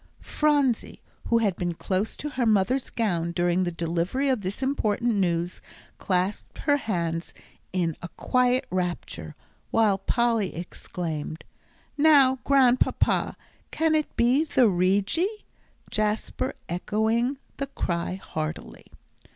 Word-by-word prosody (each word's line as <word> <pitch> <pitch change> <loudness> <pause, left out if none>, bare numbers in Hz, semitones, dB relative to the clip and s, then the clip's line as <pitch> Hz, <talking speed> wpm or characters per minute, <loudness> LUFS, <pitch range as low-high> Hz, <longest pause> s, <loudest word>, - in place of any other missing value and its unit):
Phronsie, 290 -6 +1 0.3
who 235 - +3
had 210 -5 +1
been 175 -1 -2
close 190 +5 -2
to 300 - -4
her 260 -4 -1
mother's 220 +5 +2
gown 175 -7 -1
during 175 +1 +1
the 175 - -1
delivery 170 +11 -1
of 255 -5 +1
this 195 +7 -3
important 240 -3 +1
news, 175 -3 0 0.4
clasped 185 +2 -1
her 290 -1 +2
hands 170 - -3 0.4
in 170 -4 0
a - - -5
quiet 250 +8 +1
rapture, 175 - -3 0.3
while 210 -4 +3
Polly 230 -2 +1
exclaimed, 165 -2 -5 0.6
"Now, 280 -4 +6
Grandpapa, 260 -3 +3 0.3
can 320 0 +1
it 305 -1 -1
be 245 +6 +4
the 260 -6 +3
Rigi?" 200 - +1 0.5
Jasper 215 +4 -1
echoing 220 +8 0 0.2
the 275 - -2
cry 170 -8 -2
heartily. 155 -5 -6
210 Hz, 120 wpm, -26 LUFS, 175-255 Hz, 0.6 s, Now